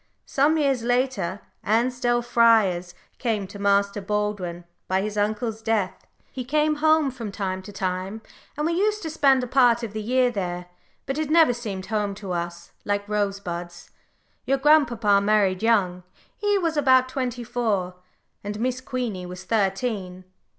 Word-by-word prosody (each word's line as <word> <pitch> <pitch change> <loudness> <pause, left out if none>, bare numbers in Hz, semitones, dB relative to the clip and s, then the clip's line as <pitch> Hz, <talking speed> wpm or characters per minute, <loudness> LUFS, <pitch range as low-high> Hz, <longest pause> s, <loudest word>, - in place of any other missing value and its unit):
Some 295 +4 +2
years 275 -5 +1
later, 235 -6 0 0.2
Ansdell 240 +2 +1
Friars 220 -7 +3 0.2
came 220 -5 -1
to 200 +2 -10
Master 200 0 +2
Baldwin, 195 -4 -2 0.2
by 190 +1 +1
his 210 0 -4
uncle's 215 +2 -1
death. 220 -4 -1 0.2
He 255 - -5
came 300 +3 +1
home 310 -2 +3
from 230 -5 -6
time 190 -2 -3
to 190 - -10
time, 190 +2 -3 0.3
and 300 - -1
we 335 - +1
used 420 +3 0
to 320 - -4
spend 275 -4 +3
a - - -3
part 240 -2 +4
of 220 -3 -5
the 215 - -3
year 250 +3 +2
there, 180 -4 -3 0.4
but 270 +3 -3
it 310 -2 -2
never 315 -5 +5
seemed 205 -6 -5
home 205 -1 -2
to 195 -2 -7
us, 170 0 -4
like 205 0 -1
Rosebuds. 195 -4 -3 0.6
Your 275 - +3
grandpapa 240 -9 +4
married 200 -3 +2
young 200 -6 +2 0.3
he 410 -1 +1
was 335 -4 0
about 260 -3 +4
twenty 255 -2 -3
four, 220 -7 -1 0.5
and 205 +1 -5
Miss 255 +2 -1
Queenie 245 -9 -4
was 180 +1 -8
thirteen. 195 -2 -1
220 Hz, 155 wpm, -24 LUFS, 195-255 Hz, 0.6 s, never